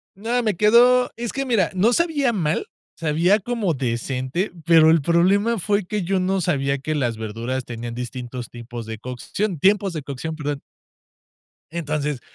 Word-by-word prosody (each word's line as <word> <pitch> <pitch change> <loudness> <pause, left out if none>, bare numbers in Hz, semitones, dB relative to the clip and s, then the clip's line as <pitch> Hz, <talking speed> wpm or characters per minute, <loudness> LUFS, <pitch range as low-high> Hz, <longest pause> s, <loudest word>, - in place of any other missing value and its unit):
No, 235 +4 -1
me 215 -4 +1
quedó 245 +5 +5
es 235 -1 -3
que, 275 - -1
mira, 230 -9 +1
no 205 +6 +3
sabía 290 -4 +2
mal, 165 -6 -1 0.3
sabía 170 +6 +2
como 210 -5 -1
decente, 130 - -2
pero 160 -1 +6
el 165 -2 +4
problema 195 +8 +3
fue 200 +1 0
que 205 0 -2
yo 190 +2 0
no 190 +1 0
sabía 140 -5 0
que 155 +3 -3
las 120 -6 -1
verduras 115 +4 -4
tenían 120 0 -6
distintos 125 0 -6
tipos 120 -1 -8
de 110 -1 -7
cocción 155 - -3
tiempos 195 +3 +3
de 155 -3 -5
cocción, 145 +3 -5
perdón. 145 -2 -4 1.1
Entonces, 150 -4 -2
165 Hz, 160 wpm, -22 LUFS, 130-205 Hz, 1.1 s, pero